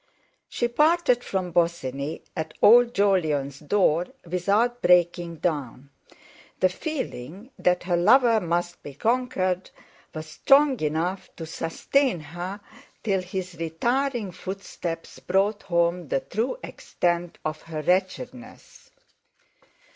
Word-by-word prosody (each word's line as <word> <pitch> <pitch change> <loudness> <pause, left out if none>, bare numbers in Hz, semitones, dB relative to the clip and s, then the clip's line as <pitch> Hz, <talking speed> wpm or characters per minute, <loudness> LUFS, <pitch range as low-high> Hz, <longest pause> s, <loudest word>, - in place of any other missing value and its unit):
She 240 - 0
parted 300 -1 +3
from 185 -2 -2
Bosinney 155 -4 -1
at 160 -2 -4
old 240 +2 +7
Jolyon's 155 -9 +1
door 175 +1 +2 0.2
without 200 +8 +1
breaking 175 -1 +3
down; 145 -5 -3 0.7
the 185 - +4
feeling 210 - -6
that 180 0 +2
her 175 -1 0
lover 230 +5 +5
must 175 -1 -2
be 140 - -10
conquered 190 - 0 0.5
was 155 0 -5
strong 275 - +4
enough 165 +5 -2
to 165 - -6
sustain 175 - 0
her 175 +6 -7 0.4
till 195 -3 +1
his 185 0 -5
retiring 235 - -1
footsteps 180 -2 -6
brought 195 +3 +1
home 170 -1 0
the 135 - 0
true 230 - -2
extent 175 0 -2
of 155 0 -3
her 155 -2 -6
wretchedness. 245 - -3
180 Hz, 110 wpm, -25 LUFS, 165-225 Hz, 0.7 s, old